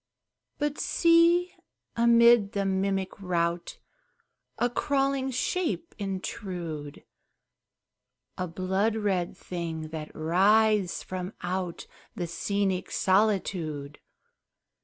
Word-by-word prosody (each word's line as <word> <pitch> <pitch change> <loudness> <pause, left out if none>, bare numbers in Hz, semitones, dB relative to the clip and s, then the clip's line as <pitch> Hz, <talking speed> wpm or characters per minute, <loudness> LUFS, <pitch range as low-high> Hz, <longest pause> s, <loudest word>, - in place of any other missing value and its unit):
But 295 0 -2
see, 340 +1 +4 0.4
amid 235 -2 +5
the 200 -1 0
mimic 195 0 -1
rout 170 -2 -1 0.8
A 240 - +2
crawling 270 +1 0
shape 330 +6 -2
intrude! 180 -6 -5 1.3
A 180 - -3
blood 190 +5 0
red 195 -5 -1
thing 165 -3 -5
that 155 -1 -6
writhes 195 +4 +3
from 185 +2 -5
out 180 -1 -3 0.3
The 175 - -2
scenic 190 +2 -1
solitude! 185 -8 0
195 Hz, 85 wpm, -28 LUFS, 175-230 Hz, 1.3 s, amid